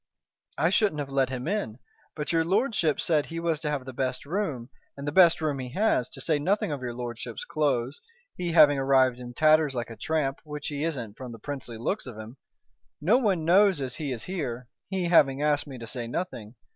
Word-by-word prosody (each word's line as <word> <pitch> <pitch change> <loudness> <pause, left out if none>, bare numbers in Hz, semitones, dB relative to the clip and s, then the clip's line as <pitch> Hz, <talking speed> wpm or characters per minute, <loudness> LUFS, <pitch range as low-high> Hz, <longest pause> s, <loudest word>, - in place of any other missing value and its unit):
"I 160 +5 +2
shouldn't 200 -6 +2
have 140 -2 -4
let 135 -1 +2
him 130 +1 -4
in. 195 - -2 0.4
But 150 0 -3
your 165 -1 +3
lordship 195 - +1
said 155 -3 +1
he 165 0 -5
was 165 -2 0
to 155 -2 -3
have 145 -3 -2
the 130 - -7
best 130 +1 -2
room, 145 - -3 0.3
and 140 +1 -6
the - - 0
best 175 0 +6
room 150 -3 -1
he 125 -1 -5
has, 195 - +1
to - - -8
say 155 -3 +1
nothing 190 +3 0
of 145 -3 -4
your 120 -2 -4
lordship's 120 -2 -6
clothes, 135 -3 -1 0.3
he 175 -2 -3
having 150 -4 +7
arrived 130 -2 +3
in 120 -1 -9
tatters 155 -2 +4
like 120 -1 -3
a - - -7
tramp, 140 +3 -1
which 150 -2 -6
he 145 0 -3
isn't 125 -10 -3
from 125 -2 -7
the - - -9
princely 125 -1 -6
looks 135 - -2
of 120 -4 -8
him. 110 +4 -9 0.6
No 205 - +4
one 190 -10 +1
knows 190 0 +5
as 130 -3 -4
he 145 -3 -3
is 115 -3 -4
here, 130 -10 -4 0.2
he 190 -2 -1
having 145 -5 +4
asked 150 0 +1
me 135 -2 -8
to 115 - -8
say 120 +1 -5
nothing. 120 - -5
145 Hz, 220 wpm, -27 LUFS, 125-165 Hz, 0.6 s, having